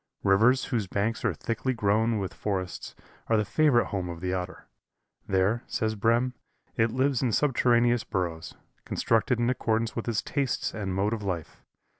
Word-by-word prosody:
Rivers 115 +7 +4
whose 115 -7 -1
banks 105 +5 -1
are - - +1
thickly 130 +3 -2
grown 110 +1 +2
with 95 -3 -3
forests 95 -4 -4 0.3
are 115 - +3
the 105 - +1
favorite 125 +2 +3
home 95 -4 -3
of 85 -1 -6
the 90 +1 -2
Otter. 90 0 -5 0.6
There, 95 +5 +1
says 110 0 -1
Brehm, 115 +4 +1 0.4
it 115 0 +2
lives 130 +2 +1
in 125 -3 +1
subterraneous 120 -2 +3
burrows, 85 -4 -3 0.3
constructed 115 +2 +1
in 120 - +1
accordance 115 -2 -1
with 115 - -4
its 115 -3 0
tastes 140 -3 -1
and 95 -3 -3
mode 100 +3 +1
of 110 - -3
life. 90 -6 -4
110 Hz, 165 wpm, -27 LUFS, 95-120 Hz, 0.6 s, Rivers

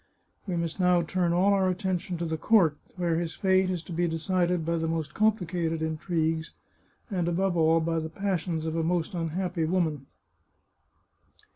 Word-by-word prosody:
We 185 - -1
must 170 +1 -3
now 180 -1 +4
turn 175 +1 0
all 185 +4 +3
our 190 -1 +2
attention 185 -1 -2
to 170 - -3
the 160 -1 -2
court, 165 -1 +4 0.2
where 170 -2 +1
his 170 -2 -4
fate 190 -1 +2
is 180 -3 -2
to 170 - -8
be 175 +1 +1
decided 175 +1 0
by 170 +1 0
the 165 0 -1
most 160 -2 -2
complicated 175 -6 0
intrigues, 160 0 -1 0.6
and, 180 -3 0
above 180 +1 +1
all, 165 0 +4
by 165 0 0
the 160 0 -4
passions 170 -3 -2
of 160 0 -2
a 165 - +1
most 170 +3 0
unhappy 175 0 -2
woman. 160 -5 -1
170 Hz, 170 wpm, -27 LUFS, 160-185 Hz, 0.6 s, now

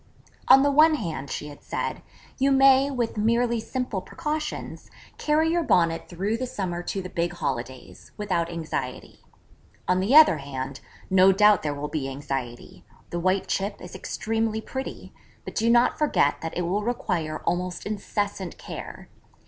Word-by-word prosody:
'On 270 - +8
the 285 - +3
one 310 +2 +6
hand,' 155 - -4
she 150 - -5
had 145 - -12
said, - - -4 0.4
'you 275 +1 +3
may, 270 0 +6
with 240 -5 -2
merely 235 +2 +2
simple 245 -4 -3
precautions, 300 +8 -5 0.3
carry 315 +2 +2
your 345 0 +2
Bonnet 170 - +1
through 195 +6 -2
the 255 +1 -3
summer 180 -6 -3
to 190 +2 -4
the - - -5
big 175 0 -1
holidays, 130 -6 -5
without 180 -5 -1
anxiety. 160 -6 -5 0.7
On 180 0 +2
the 205 +9 +2
other 305 - +8
hand, 135 -1 -6 0.3
no 190 0 +6
doubt 210 0 +5
there 145 -1 -2
will 145 +1 -4
be 145 -3 -3
anxiety: 135 -3 -6 0.3
the 175 - -2
white 185 +2 +1
chip 200 +1 -2
is 180 - -10
extremely 225 0 -2
pretty, 265 +4 -7 0.3
but - - -7
do 230 +1 +1
not 240 +1 +4
forget 300 -1 +2
that 165 +1 -5
it 180 - 0
will 185 +5 0
require 180 -9 -2
almost 180 +1 -2
incessant 205 -3 -3
care. - - -8
195 Hz, 160 wpm, -25 LUFS, 165-240 Hz, 0.7 s, On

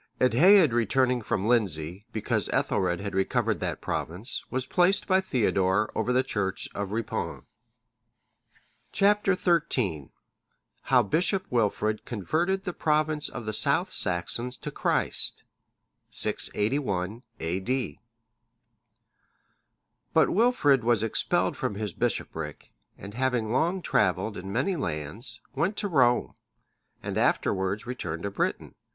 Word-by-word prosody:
Eadhaed 155 - +5
returning 125 +2 +2
from 105 -1 -2
Lindsey, 95 -4 0
because 110 - -1
Ethelred 85 +2 0
had 100 0 -5
recovered 95 0 0
that - - -3
province,(612) 100 +10 -3
was 130 0 -2
placed 180 +2 +2
by 190 0 +3
Theodore 105 - +1
over 125 - -1
the 130 +1 +3
church 95 -4 -3
of 100 -1 -4
Ripon.(613) 110 +1 -3 1.5
Chap. 205 +1 +3 0.5
XIII. 80 - -1 0.8
How 125 -2 +4
Bishop 180 - +1
Wilfrid 110 -2 0
converted 170 - -1
the 180 - -4
province 155 -1 0
of 120 - -7
the 110 - -3
South 110 - +3
Saxons 120 +8 -1
to - - -7
Christ. - - 0 0.7
[681 105 -3 +2 0.2
A.D.] 95 - -2 2.2
But - - +4
Wilfrid 180 - +3
was 115 -2 +2
expelled 115 - +1
from 105 - -3
his 105 -3 -4
bishopric, - - -3 0.3
and 100 +2 -10
having 125 -2 -1
long 170 +8 0
travelled 95 +2 +1
in 95 +1 -7
many 195 - 0
lands, 110 - -4
went 195 +5 -1
to 210 - -1
Rome,(614) 125 -8 +2 0.7
and - - -4
afterwards 95 +3 0
returned 90 -10 -5
to 100 - -3
Britain. - - -2
115 Hz, 120 wpm, -27 LUFS, 100-140 Hz, 2.2 s, Eadhaed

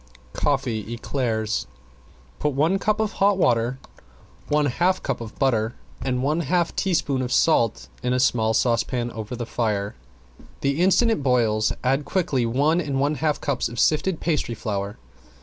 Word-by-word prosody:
~COFFEE 125 -7 -1
ECLAIRS~ 115 - -2 0.7
Put 150 -1 0
one 160 +8 +2
cup 215 +1 0
of 220 -2 0
hot 200 0 +2
water, 120 -5 +2 0.7
one 150 0 +2
half 175 +8 +1
cup - - -2
of 115 -1 -8
butter 120 -4 +1 0.3
and 125 -1 -1
one 150 +4 +1
half 170 +2 0
teaspoon 145 -8 0
of 125 -1 -3
salt 115 -9 +2
in 125 - -1
a 125 - +2
small 110 -3 +2
saucepan 120 +1 +1
over 110 +2 -6
the 120 0 -4
fire. 105 -4 -1 0.7
The 140 +4 0
instant 195 +6 +4
it 220 - 0
boils 115 -5 +2
add 135 +3 +1
quickly 140 -7 0
one 145 +8 +2
and 140 -4 -2
one 145 +2 +2
half 150 0 0
cups 140 -3 -1
of 120 0 -6
sifted 160 +3 +2
pastry 150 -8 -1
flour. 100 -3 -3
130 Hz, 160 wpm, -24 LUFS, 115-155 Hz, 0.7 s, instant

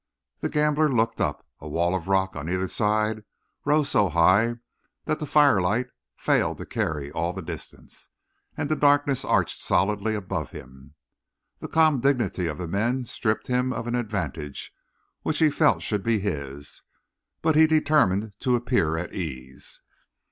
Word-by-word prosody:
The - - -2
gambler 150 0 +2
looked 115 -2 +1
up; - - -2
a 75 - -9
wall 85 +4 0
of 95 -2 -3
rock 95 -1 +1
on 75 +2 -5
either 95 +1 -1
side 110 +1 0 0.4
rose 150 -1 +2
so 105 -6 +3
high 95 +8 +4 0.5
that 155 - -1
the 150 - -4
firelight 125 -5 +3 0.3
failed - - +1
to - - -7
carry 75 -3 -3
all 85 +2 -2
the 95 -1 -6
distance, - - -9 0.5
and - - -1
the 155 - +1
darkness 145 -2 +3
arched - - +1
solidly 105 +4 +1
above 95 -8 -4
him. 65 +3 -13 0.6
The - - -6
calm 155 -4 +3
dignity 120 -9 +1
of 75 -2 -4
the 90 - -5
men 120 +8 -1
stripped 110 -2 -2
him 125 0 0
of 115 - -4
an 120 - -3
advantage 95 - -4 0.5
which 155 - -1
he 155 -2 +4
felt 150 +1 +2
should 105 -2 -1
be 115 +1 +1
his, 70 -7 -5 0.6
but 160 -1 +3
he 160 +1 +7
determined 145 -10 +2
to 125 -1 +2
appear 120 -10 +1
at 85 +1 -5
ease. 65 -7 -7
105 Hz, 160 wpm, -25 LUFS, 85-130 Hz, 0.6 s, he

